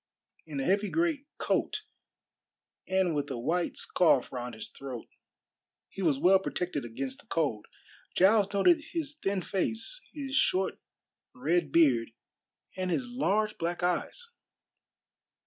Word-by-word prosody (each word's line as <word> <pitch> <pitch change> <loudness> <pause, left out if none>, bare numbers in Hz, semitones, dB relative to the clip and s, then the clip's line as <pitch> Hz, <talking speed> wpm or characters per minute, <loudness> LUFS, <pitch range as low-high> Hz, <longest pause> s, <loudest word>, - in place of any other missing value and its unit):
In 145 -3 -4
a - - 0
heavy 200 +2 +2
great 320 -4 0
coat - - 0 1.0
and 190 -2 +2
with 145 -1 -1
a 130 - -3
white 170 +9 -1
scarf 160 -8 +3
round 125 -2 -5
his 110 - -7
throat, 130 -4 -8 0.8
he 195 - -7
was 155 -7 +3
well 190 +6 +5
protected 180 -5 -3
against 260 - -5
the 260 - -19
cold. 145 - -1 0.5
Giles 200 +2 +5
noted 300 - +4
his 305 -4 -3
thin 195 -2 0
face, 225 - -1
his 275 -3 -6
short 190 -10 +2 0.6
red 155 +4 +1
beard, 130 -9 +4 0.6
and 185 -1 -2
his 245 +7 -1
large 215 -4 0
black 175 +1 -2
eyes. 320 - -1
185 Hz, 130 wpm, -30 LUFS, 145-225 Hz, 1.0 s, well